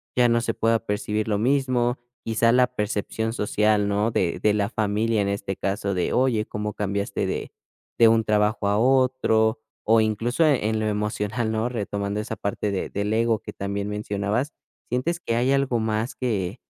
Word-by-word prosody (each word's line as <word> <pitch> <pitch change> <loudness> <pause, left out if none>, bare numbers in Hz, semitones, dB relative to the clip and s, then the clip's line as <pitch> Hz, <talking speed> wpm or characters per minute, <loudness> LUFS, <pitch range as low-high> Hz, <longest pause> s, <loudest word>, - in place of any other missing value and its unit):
ya 125 -1 +5
no 115 0 +2
se 115 -1 -1
pueda 115 0 +2
percibir 105 0 -2
lo 105 -2 +1
mismo, 125 0 +1 0.3
quizá, 115 +1 +2
la 125 0 +5
percepción 105 +1 -2
social, 105 -1 +1
¿no?, 105 +3 +1
de 90 -5 0
de 105 -1 +3
la 100 -1 0
familia 110 0 0
en 100 - 0
este 100 -1 -3
caso, 100 0 -2
de: 90 - -1
"Oye, 125 -4 +2
¿Cómo 105 0 -4
cambiaste 100 0 -2
de - - -4 0.5
de 115 - +8
un 115 0 +4
trabajo 105 -1 +1
a 105 +1 +2
otro?", 125 -4 +3 0.2
o 110 0 +4
incluso 115 +8 0
en 150 -3 +5
en 110 0 0
lo 110 - 0
emocional, 105 +2 -1
¿no?, 110 +2 0
retomando 100 -2 -3
esa 110 +1 -4
parte 100 0 -2
de 95 - -2
del 105 +2 -2
ego 115 0 +2
que - - -9
también 100 +1 -3
mencionabas, 105 +5 -2 0.4
¿sientes 160 +8 -1
que 115 - -2
hay 125 +3 +2
algo 135 -3 +2
más 110 +2 -1
que 105 -8 -2
110 Hz, 185 wpm, -24 LUFS, 105-120 Hz, 0.5 s, de